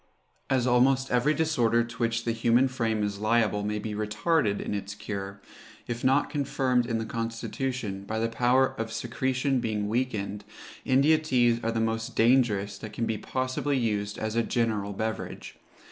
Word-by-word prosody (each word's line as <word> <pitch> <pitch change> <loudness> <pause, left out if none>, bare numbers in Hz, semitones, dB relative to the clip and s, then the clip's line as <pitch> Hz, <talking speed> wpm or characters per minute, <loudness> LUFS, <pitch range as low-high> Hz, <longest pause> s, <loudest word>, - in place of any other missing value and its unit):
As 130 -2 +2
almost 130 +2 +3
every 135 +5 +3
disorder 120 -8 +2
to 115 0 -9
which 115 -1 0
the 115 - +1
human 115 +3 +3
frame 115 -4 -1
is 100 -1 -2
liable 110 -1 +2
may 105 +1 -2
be 105 0 -4
retarded 105 +2 0
in - - -3
its 100 0 -4
cure, 100 -2 -6 0.5
if 120 0 -5
not 135 +2 +3
confirmed 130 -4 0
in 115 - 0
the 115 - -3
constitution, 115 -2 -4
by 110 +2 -3
the 115 +1 +1
power 125 +3 +2
of 115 0 -3
secretion 130 +3 -1
being 105 -3 -2
weakened, 105 -3 -2 0.4
India 140 +4 +4
teas 120 -6 +2
are 115 - 0
the 115 - -1
most 115 0 -2
dangerous 110 -5 +2
that 110 -1 -8
can 115 - -1
be 110 -2 -2
possibly 130 +2 -1
used 105 -3 -1
as 110 0 -3
a 115 - +3
general 110 -4 -1
beverage. 110 +2 -5
115 Hz, 170 wpm, -27 LUFS, 105-130 Hz, 0.5 s, India